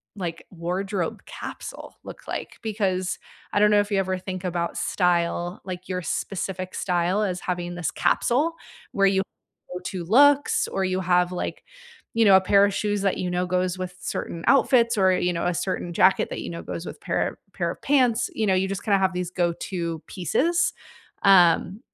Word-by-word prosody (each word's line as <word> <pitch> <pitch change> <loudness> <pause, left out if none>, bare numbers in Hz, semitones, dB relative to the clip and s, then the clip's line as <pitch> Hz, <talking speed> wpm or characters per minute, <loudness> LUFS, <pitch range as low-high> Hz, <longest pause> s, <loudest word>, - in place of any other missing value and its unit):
like, 170 -4 -5
wardrobe 180 +1 -3
capsule - - -8
look - - -10
like, - - -5
because 195 -4 -1 0.3
I 205 - +3
don't 210 0 +5
know 205 - +5
if 205 - -6
you 195 - +2
ever 185 -1 -1
think 185 0 -6
about 170 -1 -2
style, 175 0 0
like 185 0 -7
your 180 0 -2
specific 185 0 -4
style 180 +3 0
as 180 -3 -2
having 175 -1 -3
this 175 -2 -2
capsule 295 +8 +1 0.4
where 195 0 +3
you 190 0 +2 0.5
go-to 180 0 -5
looks, 285 +7 +4
or 195 - -1
you 185 0 -1
have, 180 0 +2
like, - - -4 0.5
you 230 - +4
know, 195 - +8
a - - +2
pair 200 +2 +4
of 205 - -1
shoes 205 0 -1
that 195 -1 +1
you 180 - -2
know 180 +1 0
goes 180 0 0
with 185 0 -5
certain 170 -2 -5
outfits 240 -3 +4
or, 190 -1 +4
you 180 -1 +1
know, 170 - -2
a 175 - +1
certain 175 0 -3
jacket 185 +3 +4
that - - -5
you - - -5
know 170 - -6
goes 170 - -6
with - - -8
pair - - 0
of - - -12 0.2
pair - - -1
of - - -11
pants, 255 -3 +2
you 220 - 0
know, 190 - +3
you 185 +1 +1
just 195 - -4
kinda 205 -3 +4
have 190 -1 +2
these 180 -1 -3
go-to 170 -2 -2
pieces, 330 - +1 0.5
um, 185 +1 +5
185 Hz, 190 wpm, -24 LUFS, 180-205 Hz, 0.5 s, know